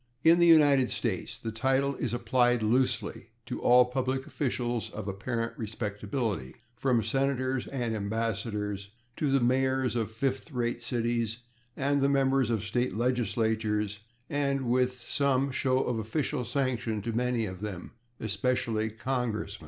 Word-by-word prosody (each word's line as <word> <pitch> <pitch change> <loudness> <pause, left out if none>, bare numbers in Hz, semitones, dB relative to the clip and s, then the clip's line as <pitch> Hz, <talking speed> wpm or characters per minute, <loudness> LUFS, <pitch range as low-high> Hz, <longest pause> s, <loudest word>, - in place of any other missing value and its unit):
In 165 +2 +6
the 170 - +6
United 145 -6 +6
States 115 +1 -2
the 115 -2 -5
title 135 +4 +1
is 125 - -2
applied 120 0 +2
loosely 120 0 0 0.2
to - - -5
all 125 0 +6
public 130 +1 -2
officials 120 -4 -2
of 105 -1 -7
apparent 115 +4 -2
respectability, 105 - -3 0.2
from 120 -1 +1
senators 130 +2 0
and 120 -4 -2
ambassadors 105 -1 -2 0.3
to 145 -3 0
the 135 - +4
mayors 130 +1 +1
of 115 -3 0
[Pg119] - - -18
fifth 135 +5 -2
rate 120 -1 -1
cities 115 -1 -1 0.4
and 140 +1 +1
the 140 - +3
members 135 -3 +2
of 110 -3 0
state 115 -1 -1
legislatures, 110 -3 0 0.3
and 140 -1 0
with 125 0 +1
some 140 -1 +1
show 130 0 +1
of 120 -2 -1
official 125 +4 -1
sanction 120 -4 -1
to 115 - -2
many 120 -1 0
of 95 -2 -7
them, 100 -4 -6 0.3
especially 110 +1 0
congressmen. 110 -3 -3
120 Hz, 145 wpm, -29 LUFS, 110-130 Hz, 0.4 s, In